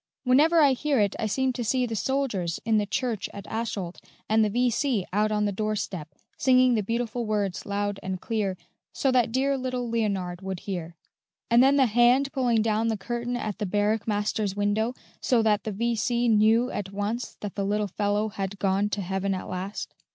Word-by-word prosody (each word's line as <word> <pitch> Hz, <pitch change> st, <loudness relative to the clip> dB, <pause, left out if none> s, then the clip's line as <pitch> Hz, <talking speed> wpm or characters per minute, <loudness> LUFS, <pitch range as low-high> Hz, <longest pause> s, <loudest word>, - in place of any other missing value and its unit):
Whenever 300 Hz, +6 st, +5 dB
I 285 Hz, -2 st, +6 dB
hear 280 Hz, 0 st, 0 dB
it 205 Hz, -1 st, +1 dB
I 220 Hz, -, 0 dB
seem 260 Hz, +4 st, 0 dB
to 240 Hz, -, -3 dB
see 250 Hz, +3 st, +1 dB
the 230 Hz, -2 st, -4 dB
soldiers 215 Hz, -9 st, -1 dB
in 220 Hz, -1 st, +3 dB
the 205 Hz, -, -1 dB
church 225 Hz, -1 st, -2 dB
at 200 Hz, -, -8 dB
Asholt 210 Hz, -6 st, -4 dB, 0.3 s
and 220 Hz, +1 st, +3 dB
the 210 Hz, -, +2 dB
V.C. 245 Hz, -1 st, +1 dB
out 210 Hz, +1 st, +2 dB
on 210 Hz, 0 st, +1 dB
the 205 Hz, -, 0 dB
door 215 Hz, +2 st, -1 dB
step, 165 Hz, -7 st, -5 dB, 0.2 s
singing 255 Hz, -1 st, +5 dB
the 220 Hz, -, +2 dB
beautiful 235 Hz, +3 st, -2 dB
words 205 Hz, -4 st, -1 dB
loud 205 Hz, 0 st, -2 dB
and 185 Hz, 0 st, -4 dB
clear, 205 Hz, -4 st, -2 dB, 0.3 s
so 270 Hz, -, +1 dB
that 245 Hz, -3 st, +2 dB
dear 270 Hz, +3 st, +1 dB
little 250 Hz, -1 st, -3 dB
Leonard 200 Hz, -6 st, -1 dB
would 190 Hz, -2 st, -5 dB
hear; 175 Hz, -4 st, -5 dB, 0.6 s
and 235 Hz, +1 st, +7 dB
then 270 Hz, +2 st, +5 dB
the 270 Hz, -2 st, +5 dB
hand 245 Hz, +4 st, +3 dB
pulling 240 Hz, -5 st, +2 dB
down 220 Hz, 0 st, +1 dB
the 220 Hz, -1 st, 0 dB
curtain 240 Hz, +4 st, -3 dB
at 215 Hz, -3 st, -4 dB
the 210 Hz, -, -1 dB
barrack 210 Hz, +3 st, 0 dB
master's 210 Hz, -1 st, -1 dB
window, 210 Hz, +4 st, 0 dB, 0.2 s
so 235 Hz, -3 st, +2 dB
that 210 Hz, -2 st, +2 dB
the 215 Hz, -, -2 dB
V.C. 235 Hz, +3 st, 0 dB
knew 225 Hz, +3 st, +4 dB
at 195 Hz, -2 st, -4 dB
once 205 Hz, +5 st, -3 dB
that 205 Hz, -2 st, -5 dB
the 200 Hz, -, -2 dB
little 210 Hz, +1 st, 0 dB
fellow 205 Hz, +2 st, 0 dB
had 200 Hz, -1 st, -4 dB
gone 195 Hz, +1 st, +1 dB
to 205 Hz, -, -2 dB
heaven 190 Hz, +1 st, -1 dB
at 185 Hz, -, -6 dB
last." 190 Hz, +3 st, -5 dB
215 Hz, 200 wpm, -26 LUFS, 200-240 Hz, 0.6 s, and